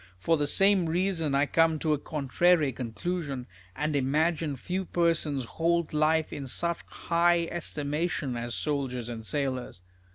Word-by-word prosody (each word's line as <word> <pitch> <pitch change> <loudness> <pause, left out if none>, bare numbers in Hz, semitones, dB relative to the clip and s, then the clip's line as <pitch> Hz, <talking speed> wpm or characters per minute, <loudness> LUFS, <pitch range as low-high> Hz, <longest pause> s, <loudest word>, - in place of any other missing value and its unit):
For 165 - +2
the 145 -2 0
same 195 +1 +4
reason, 165 -4 0
I 140 +1 +3
come 165 +1 +3
to 155 0 +1
a 150 - -1
contrary 155 +2 +2
conclusion, 130 +4 -4 0.3
and 150 +1 -1
imagine 150 +2 +1
few 185 +8 -3
persons 165 -6 +1
hold 170 +4 0
life 155 +1 +2
in 140 -2 -5
such 170 +6 0
high 170 0 +2
estimation 150 -4 -2
as 120 0 -3
soldiers 130 -5 -2
and 115 -2 -6
sailors. 130 -7 -3
150 Hz, 140 wpm, -28 LUFS, 135-170 Hz, 0.3 s, same